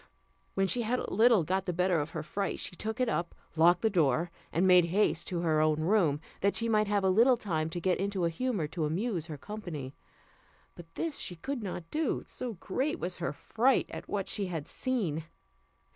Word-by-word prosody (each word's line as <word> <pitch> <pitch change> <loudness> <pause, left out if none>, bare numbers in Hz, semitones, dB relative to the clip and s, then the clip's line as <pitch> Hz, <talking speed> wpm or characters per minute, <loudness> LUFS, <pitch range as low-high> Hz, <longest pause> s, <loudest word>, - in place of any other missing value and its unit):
When 195 - +2
she 240 +5 +2
had 235 +2 0
a - - -4
little 225 -2 +5
got 190 +4 -1
the 180 - 0
better 180 0 +2
of 145 +1 -2
her 155 -2 -5
fright, 195 +4 -3
she - - -3
took 220 +6 -3
it 255 - +2
up, 175 -6 -2 0.2
locked 175 +4 +5
the 220 - +4
door, 165 -1 +2 0.2
and 175 +3 +2
made 180 -2 +7
haste 175 -2 +1
back - - -2
to 175 -2 -2
her 155 -2 +2
own 155 0 +2
room, 165 -5 +2 0.2
that 200 +1 +1
she 230 - 0
might 215 -2 +2
have 205 -1 +1
a 190 - +3
little 240 +6 +5
time 160 -8 -1
to 175 - -4
get 180 +1 +1
into 195 -2 0
a 170 - +1
humour 220 -3 -1
to 160 -1 -2
amuse 175 +1 -1
her 155 -3 -6
company; 160 -10 -6 0.8
but 165 -1 -13
this 325 -3 -2
she 175 - -3
could 265 +9 -4
not 175 -4 -6
do, 315 +1 0
so 245 -2 -5
great 265 - -2
was 180 - -3
her 170 - -2
fright 235 - +1
at - - -8
what 200 -2 -2
she 200 -2 0
had 165 -5 -4
seen. 185 - -1
185 Hz, 220 wpm, -30 LUFS, 165-220 Hz, 0.8 s, made